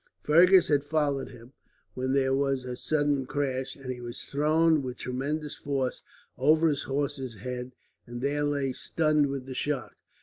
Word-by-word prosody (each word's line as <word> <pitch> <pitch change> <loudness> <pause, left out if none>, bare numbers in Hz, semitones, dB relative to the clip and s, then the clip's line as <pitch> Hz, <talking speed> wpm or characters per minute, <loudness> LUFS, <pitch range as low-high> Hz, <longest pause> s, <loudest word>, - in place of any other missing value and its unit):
Fergus 180 +4 +6
had 145 -2 +3
followed 145 -2 0
him, 125 +2 -14 0.4
when 130 +1 -1
there 135 -1 +2
was 135 -1 0
a 125 -1 -4
sudden 145 -1 0
crash, 135 -2 -2
and 135 -2 -6
he 125 -1 -6
was 120 -1 -6
thrown 155 +2 +2
with 125 -2 -5
tremendous 145 +4 -3
force 135 -3 -2 0.4
over 155 +4 +4
his 145 -2 -1
horse's 135 -3 -3
head, 125 +4 -6 0.3
and 120 0 -6
there 145 +3 0
lay 140 -2 0
stunned 155 +1 +1
with 135 -2 -4
the 130 - -6
shock. 140 -1 -3
140 Hz, 165 wpm, -28 LUFS, 130-145 Hz, 0.4 s, Fergus